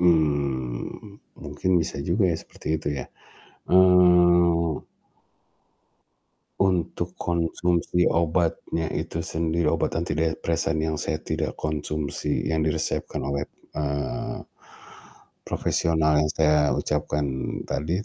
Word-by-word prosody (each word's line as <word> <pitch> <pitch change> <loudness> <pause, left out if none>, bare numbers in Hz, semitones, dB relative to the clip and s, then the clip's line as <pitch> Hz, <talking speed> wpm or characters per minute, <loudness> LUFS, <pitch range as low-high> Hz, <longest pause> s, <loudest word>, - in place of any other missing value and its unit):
Mmm, 70 - 0 0.2
mungkin 95 - -3
bisa 80 -3 -3
juga 90 +8 +1
ya - - -1
seperti - - -15
itu 75 - -3
ya, - - -4 0.6
eee 90 -3 +5 1.7
untuk 90 -3 0
konsumsi 85 +1 0
obatnya 85 0 +1
itu 85 0 -3
sendiri, 80 +1 -1
obat - - 0
antidepresan 80 0 0
yang 80 -1 -2
saya 80 - -1
tidak 80 0 -3
konsumsi, 75 -1 -2
yang 80 - +1
diresepkan 75 -3 -1
oleh, 70 +1 -2 0.2
eee, 70 -1 -3 1.0
profesional 80 -2 +2
yang 75 - +1
saya 75 -1 +4 0.2
ucapkan 75 0 -1 0.4
tadi 85 +8 -2
80 Hz, 95 wpm, -25 LUFS, 75-85 Hz, 1.7 s, eee